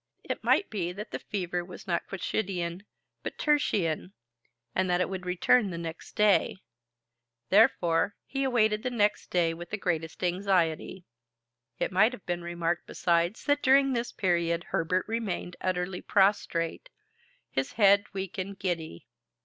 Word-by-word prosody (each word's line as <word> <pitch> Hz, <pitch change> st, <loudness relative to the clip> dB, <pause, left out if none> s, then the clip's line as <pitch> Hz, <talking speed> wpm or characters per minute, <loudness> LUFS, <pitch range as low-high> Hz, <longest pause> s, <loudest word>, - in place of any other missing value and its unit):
It -, -, -4 dB
might 395 Hz, -, +3 dB
be 180 Hz, -5 st, -2 dB
that 210 Hz, +3 st, -8 dB
the -, -, -4 dB
fever 180 Hz, -3 st, -3 dB
was 180 Hz, 0 st, -11 dB
not 170 Hz, -2 st, -1 dB
quotidian, 190 Hz, -1 st, -3 dB, 0.3 s
but -, -, -6 dB
tertian, 195 Hz, -, +1 dB, 0.6 s
and 185 Hz, 0 st, +1 dB
that 175 Hz, 0 st, +2 dB
it 180 Hz, -, 0 dB
would 185 Hz, -1 st, -5 dB
return 195 Hz, +5 st, +3 dB
next 170 Hz, -1 st, -6 dB
day. 210 Hz, -3 st, +3 dB, 0.9 s
Therefore, 185 Hz, -3 st, +4 dB
he 275 Hz, 0 st, -2 dB
awaited 220 Hz, -5 st, +2 dB
the 255 Hz, -, -1 dB
next 210 Hz, -4 st, +1 dB
day 170 Hz, -2 st, +2 dB
with 175 Hz, +1 st, -9 dB
the 205 Hz, -, -3 dB
greatest 165 Hz, -3 st, -2 dB
anxiety. 180 Hz, -1 st, 0 dB, 0.7 s
It -, -, -1 dB
might 215 Hz, +6 st, +4 dB
have 230 Hz, -, -10 dB
been 175 Hz, -1 st, -2 dB
remarked 170 Hz, 0 st, -2 dB
besides 170 Hz, +4 st, 0 dB
that 290 Hz, 0 st, +2 dB
during 270 Hz, +1 st, +5 dB
this 240 Hz, 0 st, -2 dB
period 170 Hz, -3 st, 0 dB
Herbert 180 Hz, +3 st, 0 dB
remained 215 Hz, -5 st, -3 dB
utterly 180 Hz, 0 st, -2 dB
prostrate, 190 Hz, -4 st, +1 dB, 0.6 s
his 135 Hz, 0 st, -2 dB
head 200 Hz, -1 st, +5 dB
weak 195 Hz, +1 st, -5 dB
and 195 Hz, +1 st, -4 dB
giddy. 165 Hz, -, -3 dB
185 Hz, 145 wpm, -28 LUFS, 175-210 Hz, 0.9 s, during